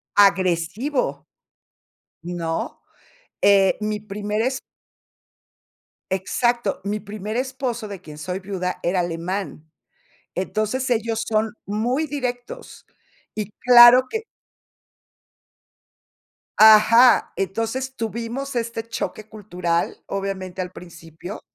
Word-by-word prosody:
Agresivo, 195 - +1 1.0
¿no?, 170 -1 -4 0.6
eh, 195 -1 +5
mi 210 0 -2
primer 210 0 -4
es 260 +2 -1 1.5
Exacto, 235 +3 0
mi 205 +2 -2
primer 210 +2 -6
esposo, 255 -4 -3
de 200 -3 -8
quien 150 -4 -11
soy 180 +5 -4
viuda, 185 -2 -4
era 180 +2 +1
alemán. 170 -1 -4 0.6
Entonces, 215 +7 -2
ellos 225 -2 0
son 220 0 0
muy 240 +9 -1
directos, 265 - -6 0.5
y 210 -1 -4
claro 245 +1 +8
que 445 - -3 2.4
Ajá, 220 +3 +7
entonces 225 +7 -2
tuvimos 235 +4 -4
este 230 -1 -2
choque 215 -1 -5
cultural, 180 -6 -2
obviamente, 190 -2 -4
al 180 -1 -5
principio 170 +2 -10
210 Hz, 90 wpm, -22 LUFS, 185-240 Hz, 2.4 s, claro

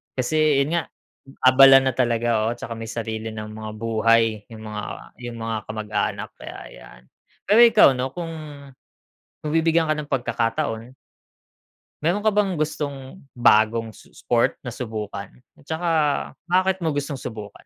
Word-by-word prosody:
kasi' 150 +2 +2
yun 165 +5 -1
nga, - - 0 0.6
abala 135 +1 +8
na 130 - +1
talaga, 120 -3 +1
oo, 120 - -1
tsaka 115 - -7
may 115 0 -7
sarili 110 -1 -4
ng 110 0 -6
mga 110 0 -7
buhay 115 -1 +2
'yung 110 -1 -10
mga 105 -1 -5
ah, - - -8
'yung 120 -1 -7
mga 115 0 -3
kamag-anak, 110 -1 -3
kaya - - -9 0.2
ayan. - - -14 0.5
Pero 210 +4 +5
ikaw, 225 -7 +7
'no, 130 +1 -2
kung 170 -2 -5 1.1
kung 150 - -3
bibigyan 165 -1 +2
ka - - +3
ng 150 - -4
pagkakataon, 115 -2 -2 1.1
meron 175 +6 +1
ka - - +6
bang 205 -2 +2
gustong 145 +1 -4
bagong 115 -1 +3
s - - -17
sport 120 -1 +1
na - - -3
subukan 110 -4 -5 0.3
at 140 - -21
saka 165 +2 -1 0.6
bakit 185 +1 +2
mo 160 - +1
gustong 140 -1 -3
subukan? 105 -4 -7
120 Hz, 155 wpm, -23 LUFS, 110-155 Hz, 1.1 s, abala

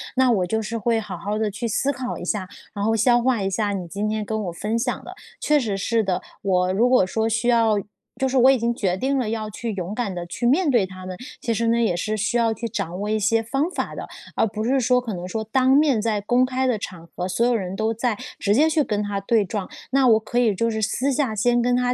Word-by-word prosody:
那 260 -1 +4
我 190 -6 +2
就 220 +4 0
是 220 +2 -4
会 230 +1 +1
好 205 -4 -6
好 205 +5 -3
的 215 -1 0
去 235 +4 -3
思 270 +5 +1
考 255 -2 -4
一 - - -7
下， 190 0 -2 0.3
然 200 -2 -3
后 225 +2 +2
消 240 +2 +4
化 240 -4 +1
一 195 - 0
下 205 +1 -1
你 185 -3 -4
今 205 +5 -2
天 215 -1 -2
跟 220 0 -2
我 175 - -3
分 210 +6 -2
享 245 +1 -2
的。 - - -9 0.3
确 300 0 +3
实 215 -7 -2
是 225 +3 +1
的， 190 -3 -1 0.2
我 185 -1 +1
如 230 +6 +3
果 250 -7 +5
说 220 +4 -1
我 - - +1
需 225 +2 0
要 230 -3 +4 0.4
就 265 +1 +1
是 - - -3
说 265 - +3
我 255 +2 +7
已 270 - +5
经 235 0 0
决 190 -6 0
定 270 +6 0
了 235 -4 -1
要 215 -1 -3
去 225 +2 -4
勇 185 0 -4
敢 215 -5 -3
地 175 -1 -4
去 205 +7 -4
面 305 +6 +3
对 235 -6 +3
他 185 0 -10
们， 185 -1 -6 0.2
其 230 - 0
实 230 +1 0
呢， 230 +1 +3
也 225 -6 +2
是 215 +5 -2
需 220 +3 0
要 230 -1 +2
去 230 - -6
掌 180 -6 -4
握 205 +1 -3
一 215 0 +1
些 225 +2 +2
方 275 +8 -1
法 - - -3
的， - - -6 0.3
而 - - +3
不 215 +1 -4
是 265 +4 +2
说 250 0 +3
可 230 -3 -5
能 180 -1 -5
说 220 +4 -3
当 255 +4 +2
面 275 -5 +4
在 215 -2 0
公 245 +5 +3
开 260 0 -1
的 250 -3 +1
场 175 -4 -7
合， 180 - -3
所 190 +6 +1
有 245 - +3
人 190 -4 -2
都 220 +2 0
在 230 -1 -1 0.2
直 205 0 +2
接 305 +6 +4
去 310 -1 +2
跟 210 -1 -1
她 205 -1 -2
对 215 +2 +2
撞。 200 -1 -4 0.2
那 270 -1 +4
我 225 -2 +6
可 225 +2 -2
以 225 -5 +3
就 230 +4 0
是 220 0 -2
私 255 +6 0
下 260 -5 0
先 240 +3 +2
跟 245 +1 +2
她 250 0 +1
225 Hz, 300 characters per minute, -23 LUFS, 205-245 Hz, 0.4 s, 我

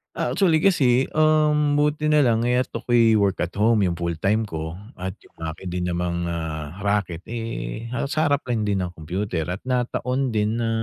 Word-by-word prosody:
Ah, - - -1
actually 170 -5 +3
kasi, 135 -9 +3
um, 155 -1 +3
buti 150 +1 +1
na 150 - +5
lang, 115 -4 +3
eh, 125 +1 +2
at 130 - -2
ako'y 115 -1 +3
work 100 -2 +1
at 90 +2 -3
home 110 +1 +3
yung 90 -3 +1
full 85 0 -2
time 110 +3 +2
ko 80 -4 -5 0.2
at 95 +1 -6
yung - - -23
akin 80 +3 -5
din 90 0 -2
namang, 85 0 -2
ah, 80 -3 -4 0.2
raket, 100 -4 -1
eh, 115 - -5
halos 125 +4 -3
sa 155 -1 +2
harap 145 0 +1
lang 120 -3 -1
din 100 -3 0
ng 90 - -5
kompyuter 85 0 -3
at 90 +6 -5
nataon 125 +1 -1
din 110 +1 0
na, 115 - 0
110 Hz, 200 wpm, -23 LUFS, 90-125 Hz, 0.2 s, na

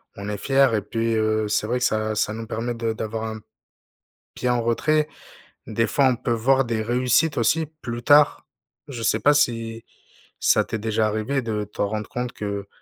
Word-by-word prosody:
on 100 +1 -6
est 105 - -3
fier 135 0 +3
et 105 - 0
puis, 115 +2 -1
heu, 110 0 +1
c'est 105 - 0
vrai 120 +3 -1
que - - -2
ça 110 0 0
ça 105 0 0
nous 115 +1 -6
permet 115 +2 -3
de 115 -1 -2
d'avoir 110 0 -4
un 110 0 -5 0.9
pied 125 - -2
en 120 -1 +2
retrait. 150 +6 +1 0.6
Des 115 - +1
fois, 140 - +2
on 130 - +2
peut 120 +1 -3
voir 130 +4 +3
des 115 -2 -1
réussites 125 +7 +1
aussi 155 +7 +2
plus 120 0 -5
tard. 145 +3 +4 0.4
Je 120 -5 -6
sais 110 0 +2
pas 145 +6 +4
si 115 -5 0 0.5
ça - - +4
t'est 110 - -4
déjà 110 0 0
arrivé 110 +6 -1
de 105 -2 -2
t'en 105 0 -2
rendre 105 0 -4
compte 125 0 -3
que, 100 -1 -5
115 Hz, 195 wpm, -23 LUFS, 110-125 Hz, 0.9 s, tard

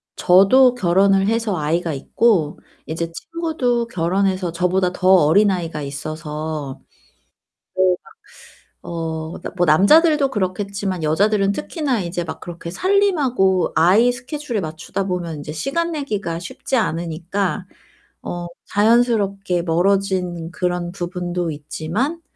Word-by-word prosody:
저도 220 +8 +5
결혼을 195 -1 +3
해서 225 -3 0
아이가 160 +2 -1
있고 160 - +1 0.3
이제 165 +1 -4
친구도 255 - -2
결혼해서 185 0 0
저보다 180 +2 +1
더 185 - -1
어린 190 +3 +5
아이가 170 -4 -3
있어서. 150 0 -5 1.0
네 185 -1 +4
막 - - -18 0.8
어 160 -1 -4 0.2
뭐 175 - +3
남자들도 290 - +5
그렇겠지만 195 -3 -2
여자들은 195 +6 +2
특히나 285 - -2
이제 175 0 -3
막 165 - -7
그렇게 170 -1 -8
살림하고 275 - +2
아이 210 +9 +5
스케줄에 250 -1 -4
맞추다 160 +4 -4
보면 180 -3 -3
인제 145 +1 -7
시간 275 - -2
내기가 210 - -3
쉽지 215 +8 -3
않으니까 175 +1 -2 0.6
어 175 0 -5 0.2
자연스럽게 205 -4 +2
멀어진 180 -1 0
그런 180 -1 -2
부분도 175 -2 -3
있지만 165 - -3
185 Hz, 280 characters per minute, -20 LUFS, 170-220 Hz, 1.0 s, 저도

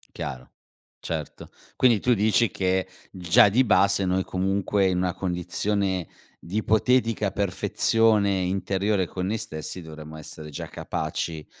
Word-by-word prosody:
Chiaro. 65 0 -6 0.5
Certo. 80 -3 -6 0.3
Quindi 120 -5 +4
tu 125 - +2
dici 110 +2 +3
che, 95 0 0 0.2
già 90 +3 +5
di 125 +6 +3
base, 100 -2 +3
noi, 95 +1 +1
comunque, 95 +1 0
in 90 -1 0
una 90 -1 0
condizione 95 0 -2 0.3
di 90 +5 -5
ipotetica 110 -1 +2
perfezione 100 +1 +2
interiore 95 +1 0
con 90 +1 -4
noi 110 - -1
stessi 85 -3 -6
dovremmo 80 -1 -10
essere 75 0 -9
già 70 - -6
capaci 80 -2 -4
95 Hz, 130 wpm, -25 LUFS, 90-105 Hz, 0.5 s, già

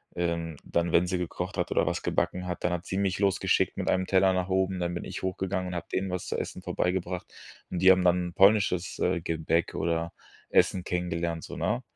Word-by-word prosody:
ähm 85 -2 -2
dann, 85 0 0
wenn 85 +1 +4
sie 90 +1 0
gekocht 90 -1 -4
hat - - -1
oder - - +2
was - - -1
gebacken 90 0 -1
hat, 90 - -4
dann 85 - +1
hat 85 0 -4
sie 95 - -3
mich 95 -1 0
losgeschickt 100 -2 +2
mit - - -1
einem 95 0 +1
Teller 95 0 +4
nach 90 0 -1
oben. 95 0 +1
Dann 85 0 -1
bin 85 - -4
ich - - -6
hochgegangen 95 0 -2
und 90 - -5
hab 85 +2 -5
denen 95 0 -1
was 90 -1 -4
zu - - -2
essen - - -5
vorbeigebracht. 90 0 -2 0.4
Und 90 - -3
die 95 - +8
haben 95 -1 +4
dann 90 0 +3
'n - - -13
polnisches, 95 -2 +3
äh, 90 -2 +1
Gebäck 80 0 0
oder 85 0 -1 0.4
Essen 90 - +3
kennengelernt, 85 -2 -2
so, - - -8
ne? 120 +4 0
90 Hz, 220 wpm, -28 LUFS, 85-95 Hz, 0.4 s, die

